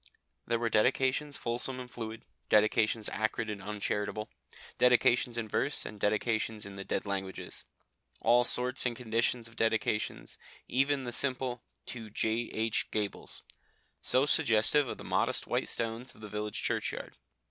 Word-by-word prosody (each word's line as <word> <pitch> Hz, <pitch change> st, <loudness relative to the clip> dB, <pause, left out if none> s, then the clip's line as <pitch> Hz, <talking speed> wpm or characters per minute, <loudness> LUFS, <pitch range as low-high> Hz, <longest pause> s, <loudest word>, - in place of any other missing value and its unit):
There 115 Hz, -, +2 dB
were 115 Hz, 0 st, -1 dB
dedications 130 Hz, +5 st, +2 dB
fulsome 120 Hz, +2 st, -1 dB
and 125 Hz, -, -6 dB
fluid, 115 Hz, -2 st, -6 dB, 0.3 s
dedications 110 Hz, +1 st, +3 dB
acrid 110 Hz, 0 st, -1 dB
and 100 Hz, -1 st, -6 dB
uncharitable, 105 Hz, +1 st, -2 dB, 0.5 s
dedications 125 Hz, -1 st, +4 dB
in 115 Hz, -2 st, -2 dB
verse 135 Hz, +6 st, 0 dB
and 105 Hz, -, -8 dB
dedications 110 Hz, +1 st, 0 dB
in 100 Hz, -, -8 dB
the 100 Hz, 0 st, -6 dB
dead -, -, -2 dB
languages: 95 Hz, -1 st, -4 dB, 0.5 s
all 120 Hz, +1 st, +5 dB
sorts 125 Hz, +1 st, +1 dB
and 120 Hz, -, -2 dB
conditions 115 Hz, 0 st, 0 dB
of 115 Hz, -, -12 dB
dedications, 110 Hz, -1 st, 0 dB, 0.3 s
even 135 Hz, +1 st, +2 dB
the 120 Hz, -, -4 dB
simple 125 Hz, -1 st, -1 dB, 0.2 s
"To 115 Hz, -3 st, -7 dB
J.H. 110 Hz, +1 st, 0 dB
Gabbles" 105 Hz, -2 st, -3 dB, 0.6 s
so 130 Hz, -, +3 dB
suggestive 120 Hz, +1 st, +3 dB
of -, -, -4 dB
the -, -, -9 dB
modest -, -, +1 dB
white -, -, -1 dB
stones 115 Hz, +2 st, -3 dB
of -, -, -17 dB
the 105 Hz, -, -8 dB
village 105 Hz, 0 st, -3 dB
churchyard. -, -, -1 dB
115 Hz, 145 wpm, -31 LUFS, 105-125 Hz, 0.6 s, all